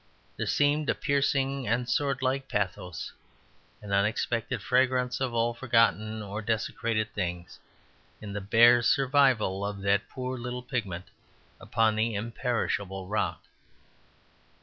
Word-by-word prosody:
There -, -, -3 dB
seemed 145 Hz, +1 st, +2 dB
a -, -, +2 dB
piercing 140 Hz, -2 st, 0 dB
and 115 Hz, +3 st, +1 dB
swordlike 135 Hz, +1 st, 0 dB
pathos, 90 Hz, -4 st, -3 dB, 0.7 s
an 105 Hz, -, -8 dB
unexpected 110 Hz, +3 st, 0 dB
fragrance 125 Hz, 0 st, +1 dB
of 130 Hz, -2 st, 0 dB
all 115 Hz, +1 st, +1 dB
forgotten 115 Hz, -3 st, +1 dB
or 105 Hz, +2 st, -5 dB
desecrated 110 Hz, 0 st, -1 dB
things, 90 Hz, -3 st, -4 dB, 0.6 s
in 105 Hz, -2 st, -7 dB
the 100 Hz, -, -3 dB
bare 120 Hz, +4 st, +6 dB
survival 130 Hz, -7 st, +3 dB
of 100 Hz, -1 st, -4 dB
that 100 Hz, +1 st, +1 dB
poor 130 Hz, 0 st, -5 dB
little 125 Hz, +1 st, -5 dB
pigment 100 Hz, -9 st, -4 dB, 0.5 s
upon 110 Hz, -1 st, +1 dB
the 110 Hz, 0 st, 0 dB
imperishable 105 Hz, -4 st, -2 dB
rock. 105 Hz, -, -1 dB
115 Hz, 120 wpm, -28 LUFS, 105-130 Hz, 0.7 s, bare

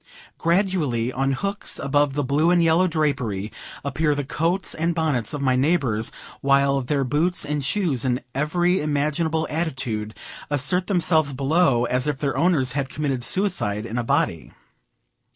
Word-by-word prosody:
Gradually, 165 Hz, -, +1 dB
on 135 Hz, +1 st, 0 dB
hooks 200 Hz, +8 st, -2 dB
above 140 Hz, 0 st, +1 dB
the 145 Hz, -, 0 dB
blue 145 Hz, +5 st, +2 dB
and 175 Hz, -1 st, +4 dB
yellow 165 Hz, +3 st, +4 dB
drapery, 135 Hz, -, -1 dB, 0.3 s
appear 145 Hz, +2 st, +1 dB
the 145 Hz, -, -2 dB
coats 170 Hz, +7 st, -1 dB
and 165 Hz, +1 st, -1 dB
bonnets 150 Hz, -8 st, 0 dB
of 145 Hz, -2 st, -4 dB
my 130 Hz, -1 st, +3 dB
neighbors, 130 Hz, -6 st, +1 dB, 0.3 s
while 140 Hz, 0 st, +3 dB
their 135 Hz, +2 st, 0 dB
boots 150 Hz, +7 st, +1 dB
and 150 Hz, -1 st, -2 dB
shoes, 145 Hz, -, 0 dB
in 125 Hz, -1 st, 0 dB
every 175 Hz, +6 st, +1 dB
imaginable 155 Hz, +2 st, 0 dB
attitude, 130 Hz, -9 st, -3 dB, 0.3 s
assert 145 Hz, +6 st, +1 dB
themselves 160 Hz, -6 st, +2 dB
below, 135 Hz, -2 st, +2 dB
as 125 Hz, +3 st, 0 dB
if 145 Hz, -2 st, -1 dB
their 140 Hz, 0 st, -2 dB
owners 155 Hz, -8 st, +2 dB
had 135 Hz, 0 st, -2 dB
committed 135 Hz, -5 st, -2 dB
suicide 115 Hz, -, 0 dB
in 115 Hz, +1 st, -3 dB
a -, -, -1 dB
body. -, -, 0 dB
145 Hz, 150 wpm, -23 LUFS, 130-165 Hz, 0.3 s, and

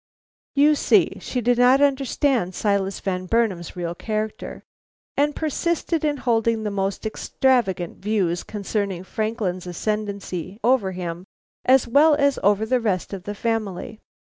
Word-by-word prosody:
You 290 Hz, +2 st, +5 dB
see 295 Hz, -, +2 dB
she 250 Hz, -, -3 dB
did 245 Hz, +1 st, +2 dB
not 250 Hz, +2 st, +6 dB
understand 270 Hz, -, +1 dB
Silas 200 Hz, -2 st, 0 dB
Van 185 Hz, -1 st, -3 dB
Burnam's 195 Hz, -7 st, 0 dB
real 170 Hz, -1 st, -3 dB
character, 215 Hz, +3 st, -4 dB, 0.5 s
and 295 Hz, +1 st, +1 dB
persisted 325 Hz, +1 st, -1 dB
in 295 Hz, -1 st, +1 dB
holding 230 Hz, -3 st, +1 dB
the 210 Hz, -, -2 dB
most 195 Hz, 0 st, -2 dB
extravagant 220 Hz, -6 st, 0 dB
views 190 Hz, -4 st, 0 dB
concerning 200 Hz, -3 st, -3 dB
Franklin's 205 Hz, -4 st, -3 dB
ascendancy 200 Hz, -1 st, -4 dB
over 230 Hz, -6 st, +2 dB
him 175 Hz, 0 st, -5 dB, 0.4 s
as 260 Hz, -1 st, +5 dB
well 295 Hz, +5 st, +5 dB
as 280 Hz, -1 st, +2 dB
over 205 Hz, +2 st, +3 dB
the 255 Hz, +3 st, +1 dB
rest 200 Hz, -5 st, -1 dB
of 190 Hz, -1 st, -7 dB
the 205 Hz, -, -4 dB
family. 215 Hz, -2 st, -3 dB
215 Hz, 140 wpm, -23 LUFS, 190-255 Hz, 0.5 s, not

